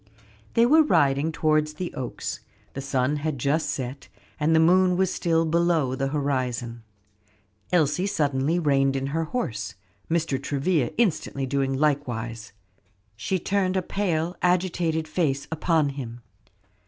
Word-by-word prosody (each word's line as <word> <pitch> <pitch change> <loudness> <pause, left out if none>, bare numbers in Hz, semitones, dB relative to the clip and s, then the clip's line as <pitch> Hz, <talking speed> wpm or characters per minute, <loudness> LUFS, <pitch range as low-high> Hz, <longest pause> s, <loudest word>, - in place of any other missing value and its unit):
They 230 - +5
were 310 +6 +6
riding 145 - +2
towards 155 -1 +1
the 180 +2 -5
Oaks; 125 -2 -5 0.3
the 135 - -5
sun 135 +1 0
had 150 -1 -2
just 140 +6 0
set, 130 +1 -5 0.3
and 155 +2 +3
the - - +5
moon 180 +2 +4
was 190 -1 +1
still 165 -1 +1
below 165 -4 +2
the 135 +1 -1
horizon. 130 -5 -2 0.9
Elsie 180 +2 +2
suddenly 145 -3 0
reined 135 -4 +2
in 135 0 -1
her 165 0 0
horse, 115 - -3 0.3
Mr. 160 -5 0
Travilla 140 0 0
instantly 160 - 0
doing 135 0 0
likewise, 120 -6 -1 0.8
and 185 -3 -1
turned 190 -2 +1
a 185 - 0
pale, 175 -3 -1
agitated 175 -3 +1
face 140 -6 -1
upon 160 -2 +1
him. 120 -4 -7
155 Hz, 135 wpm, -25 LUFS, 135-170 Hz, 0.9 s, were